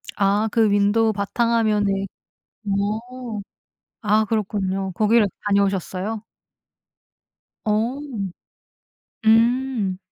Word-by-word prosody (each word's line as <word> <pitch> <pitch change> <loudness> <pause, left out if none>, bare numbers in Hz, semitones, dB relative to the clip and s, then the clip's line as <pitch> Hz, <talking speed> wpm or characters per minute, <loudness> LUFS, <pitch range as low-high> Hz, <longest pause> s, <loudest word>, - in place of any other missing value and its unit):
아 205 +2 +2
그 225 -2 +3
윈도우 205 +2 +3
바탕 215 +4 0
화면에 205 -3 +1 0.6
어. 215 +3 -3 0.6
아 215 0 +3
그렇군요. 195 -3 -1
거기를 215 +2 +4 0.2
다녀오셨어요? 200 +1 0 1.4
어. 220 +5 0 1.3
음. 230 -3 +3
210 Hz, 160 characters per minute, -22 LUFS, 200-225 Hz, 1.4 s, 거기를